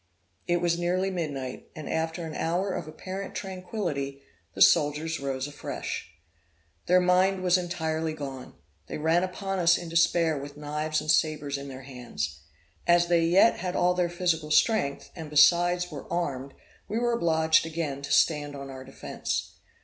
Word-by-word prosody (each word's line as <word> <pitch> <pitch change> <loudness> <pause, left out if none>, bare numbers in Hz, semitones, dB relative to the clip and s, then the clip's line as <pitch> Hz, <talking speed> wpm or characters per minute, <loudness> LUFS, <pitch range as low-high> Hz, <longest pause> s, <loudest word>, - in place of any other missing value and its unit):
It 175 0 +1
was 170 -1 +1
nearly 185 +2 0
midnight; 145 -8 -4
and 155 - -7
after 165 +1 -2
an 160 - -6
hour 180 +5 -1
of - - -4
apparent 185 +5 -7
tranquility, 180 -8 -4 0.3
the - - -5
soldiers 150 +2 +3
rose 135 -1 -2
afresh. 145 0 -5 0.8
Their 180 +1 +6
mind 185 +1 +3
was 180 -1 +4
entirely 160 -3 -1
gone; 135 -4 -7 0.3
they - - -5
ran 160 +3 +2
upon 195 +1 -3
us 170 -1 +5
in 170 - -7
despair 165 -2 +3
with 145 +1 -9
knives 150 +1 -2
and 155 - +1
sabres 150 -3 +1
in 140 - -7
their 130 -1 -8
hands. 120 - -5 0.5
As 175 0 +4
they 170 -1 +4
yet 185 +7 +5
had 180 +1 -3
all 180 0 +3
their 180 -1 0
physical 170 -3 0
strength, 155 -3 +2
and 160 -3 -7
besides 175 +4 +4
were 145 -3 -8
armed, 140 -6 -2 0.3
we 215 - -2
were 240 0 +1
obliged 160 -6 +3
again 155 -4 -3
to 140 - -6
stand 145 -3 +2
on 140 -1 -7
our 130 0 -8
defence. 135 +1 -4
160 Hz, 165 wpm, -27 LUFS, 145-175 Hz, 0.8 s, Their